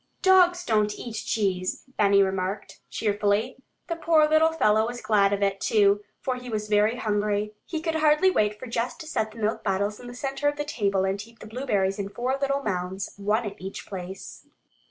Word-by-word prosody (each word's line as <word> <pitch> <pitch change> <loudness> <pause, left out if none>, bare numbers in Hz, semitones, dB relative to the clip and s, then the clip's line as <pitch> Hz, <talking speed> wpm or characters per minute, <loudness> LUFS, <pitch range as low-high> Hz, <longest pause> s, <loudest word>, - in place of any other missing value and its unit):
"Dogs 360 -2 +5
don't 210 -5 +1
eat 235 - -7
cheese," 195 -4 -1
Benny 200 -1 +5
remarked 190 +1 -3
cheerfully. 210 +3 0 0.3
The 335 - -3
poor 320 -2 +4
little 315 +1 +4
fellow 220 -8 +3
was 240 0 -5
glad 200 -3 +3
of 200 0 0
it, 195 0 0
too, 205 -1 +3 0.2
for 255 -1 -2
he 250 0 -8
was 215 -2 -3
very 210 +2 +3
hungry. 210 -2 -1
He 320 -2 -3
could 325 0 -1
hardly 315 +4 +4
wait 210 - +1
for 235 - -8
Jess 230 +1 -2
to - - -10
set 220 -8 -1
the 220 - -15
milk 215 0 -1
bottles 200 +2 -1
in 245 - -10
the 245 - -9
center 275 +2 -2
of 290 - +1
the 295 - -2
table 200 -9 0
and 195 +1 -1
heap 230 +2 -14
the - - -11
blueberries 210 -4 -1
in 200 0 -3
four 250 +5 -1
little 275 0 0
mounds, 185 -1 -3
one 210 +3 0
at 205 -1 -7
each 190 +1 -7
place. 190 0 -8
215 Hz, 200 wpm, -26 LUFS, 200-260 Hz, 0.3 s, Dogs